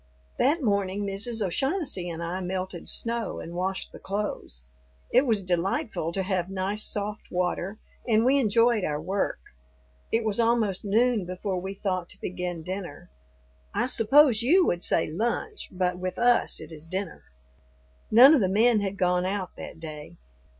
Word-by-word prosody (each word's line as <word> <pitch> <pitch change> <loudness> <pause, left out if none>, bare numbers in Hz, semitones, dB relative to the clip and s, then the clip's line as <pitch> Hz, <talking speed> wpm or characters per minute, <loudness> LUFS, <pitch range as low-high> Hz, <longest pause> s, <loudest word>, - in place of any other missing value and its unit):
That 290 +4 +2
morning 200 -2 0
Mrs. 210 +3 -1
O'Shaughnessy 270 - -1
and 170 0 -5
I 175 +2 -3
melted 185 -1 -4
snow 230 -1 0
and 170 - -8
washed 185 +2 -2
the - - -11
clothes. 195 - -4 0.5
It 255 +3 +4
was 215 -4 +1
delightful 180 -1 -1
to 190 - -1
have 185 -2 -1
nice 195 +2 -2
soft 210 +1 -3
water, 180 +3 -2 0.3
and 225 0 +3
we 275 +2 +4
enjoyed 230 -2 +3
our 150 -3 -1
work; 190 +5 -1 0.7
it 225 +1 +2
was 215 0 -1
almost 230 -5 +1
noon 220 0 +2
before 185 0 -3
we 190 +2 -5
thought 185 -3 -2
to - - -11
begin 180 -2 -4
dinner. 180 - -7 0.6
I - - +2
suppose 250 0 +4
you 345 +10 +4
would 175 - 0
say 165 - +2
lunch, 240 - -2
but 180 -1 -1
with 185 0 -4
us 240 0 +2
it - - -10
is 160 0 -10
dinner. 185 +1 -4 0.9
None 250 +7 +9
of 290 - +4
the 190 - +2
men 220 +2 +4
had 200 0 -3
gone 180 -1 +1
out 190 -2 -3
that - - -9
day. 150 - -9
195 Hz, 165 wpm, -26 LUFS, 180-230 Hz, 0.9 s, None